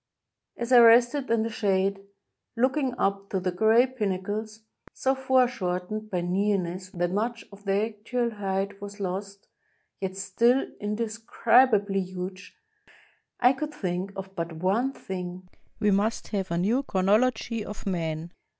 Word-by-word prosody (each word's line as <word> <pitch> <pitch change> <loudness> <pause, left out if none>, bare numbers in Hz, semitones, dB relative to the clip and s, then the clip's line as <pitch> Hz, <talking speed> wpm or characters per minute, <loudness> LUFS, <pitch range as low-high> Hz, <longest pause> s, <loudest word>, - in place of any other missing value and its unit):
As 235 +1 -4
I 250 - +9
rested 240 +4 +6
in 230 -1 +2
the 230 - -3
shade, 195 -2 +1 0.6
looking 260 +1 +1
up 195 0 -1
to 190 - -1
the 185 0 -1
gray 220 +6 +4
pin 255 -6 -2
nacles, 210 +4 -4 0.3
so 265 - +1
foreshortened 215 -6 0
by 180 -3 -1
nearness 185 0 -1
that 175 -1 -2
much 230 +4 -2
of 200 +1 -15
their 200 +2 +2
actual 235 +3 -2
height 195 -1 -3
was 205 0 -8
lost, 195 +1 -5 0.5
yet 190 -1 -4
still 235 +7 +2
indescribably 215 -1 +2
huge, 185 +1 -7 0.8
I 250 +1 +5
could 300 +3 -5
think 185 -4 -3
of 195 0 -8
but 170 -2 -3
one 195 +11 +1
thing: 180 -5 -7 0.3
we 210 -2 +3
must 205 +4 0
have 195 -3 -2
a 170 - -1
new 215 +9 +2
chronology 220 +1 +1
of 210 0 -8
Man. 165 -3 -2
205 Hz, 140 wpm, -27 LUFS, 190-230 Hz, 0.8 s, I